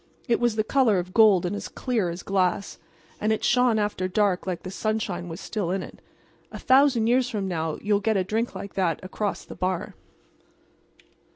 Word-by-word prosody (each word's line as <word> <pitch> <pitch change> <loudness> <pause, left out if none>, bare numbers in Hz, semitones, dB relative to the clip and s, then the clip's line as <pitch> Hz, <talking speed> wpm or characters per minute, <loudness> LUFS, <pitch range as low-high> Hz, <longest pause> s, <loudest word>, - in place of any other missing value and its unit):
It 235 - +2
was 240 -2 +1
the 215 - +1
color 235 -4 +3
of 180 +1 -4
gold 210 -6 +5
and 180 - -2
as - - -5
clear 230 -9 -1
as 170 +2 -6
glass, 195 0 -1 0.4
and 215 - 0
it 220 - -1
shone 245 -2 +3
after 205 -3 -1
dark 190 -1 0
like 180 -2 -3
the 185 - -6
sunshine 215 -4 -2
was 165 +2 -7
still 210 -6 -3
in 190 0 -1
it. - - -12 0.5
A - - -7
thousand 260 -3 +4
years 245 +2 +2
from 205 -5 -3
now 160 -3 -2
you'll 205 -1 +2
get 215 0 +1
a 190 - +1
drink 220 +4 -2
like 195 +1 -7
that 175 -5 0
across 200 +2 -3
the - - -9
bar. 185 -1 -2
205 Hz, 195 wpm, -25 LUFS, 185-220 Hz, 0.5 s, gold